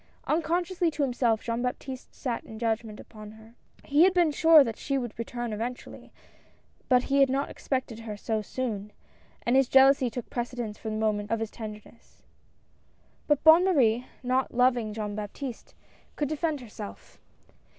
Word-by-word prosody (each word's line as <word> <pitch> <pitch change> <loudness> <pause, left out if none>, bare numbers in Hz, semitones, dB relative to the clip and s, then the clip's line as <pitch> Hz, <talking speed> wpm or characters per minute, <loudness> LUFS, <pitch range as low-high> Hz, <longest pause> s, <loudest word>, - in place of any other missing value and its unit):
Unconsciously 345 +2 0
to 300 -2 -2
himself 240 -4 +1
Jean 230 0 -2
Baptiste 255 +1 -5
sat 245 -4 -3
in 220 - -10
judg 225 0 0
ment 215 -2 -10
upon 215 -1 -11
her. 220 +1 -16 0.3
He 290 +2 +2
had 370 0 +4
been 345 -3 +4
sure 320 +1 +7
that 230 -4 -4
she 275 -1 -1
would 240 -4 -4
return 240 0 -4
eventually, 240 +4 -6 0.8
but 250 -1 +4
he 275 0 +1
had 275 -1 +5
not 275 +2 -1
expected 255 -4 -3
her 220 -2 -7
so 220 +1 -2
soon, 210 -2 -4 0.5
and 240 - +2
his 270 -1 +4
jealousy 270 -1 +5
took 235 +1 -6
precedence 240 -3 -4
for 220 - -5
the 215 - -3
moment 215 -1 -1
of 225 0 0
his 225 -1 -4
tenderness. 215 0 -11 1.0
But 295 -2 +2
Bonne 325 +2 +8
Marie, 250 -10 +2 0.2
not 255 +1 0
loving 245 -3 +2
Jean 210 -1 -4
Baptiste, 215 +4 -7 0.4
could 295 -2 -1
defend 310 -2 -1
herself. 210 - -10
245 Hz, 165 wpm, -27 LUFS, 220-275 Hz, 1.0 s, Bonne